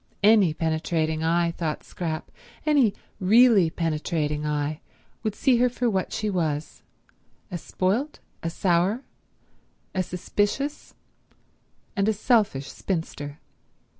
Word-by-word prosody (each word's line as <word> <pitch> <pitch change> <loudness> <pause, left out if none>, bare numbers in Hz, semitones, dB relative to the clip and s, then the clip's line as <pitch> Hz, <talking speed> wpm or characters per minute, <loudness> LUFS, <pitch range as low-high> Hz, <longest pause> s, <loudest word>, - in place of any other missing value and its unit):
Any 205 -5 +6
penetrating 160 0 0
eye, 170 +1 +2
thought 165 -2 -3
Scrap, 160 -3 -5 0.3
any 280 -9 +4 0.2
really 210 -2 +6
penetrating 155 -2 -1
eye, 150 +1 -1 0.4
would 215 -2 -2
see 260 0 +3
her 250 +1 +4
for 245 -1 0
what 190 -2 -1
she 215 - -2
was—a 170 +1 -5
spoilt, 215 - -1 0.2
a 165 - -2
sour, 185 +7 +1 0.9
a 185 - +1
suspicious 205 - -2 1.0
and 200 0 +2
a - - +3
selfish 210 - +1
spinster. 150 -5 -4
180 Hz, 105 wpm, -25 LUFS, 160-215 Hz, 1.0 s, Any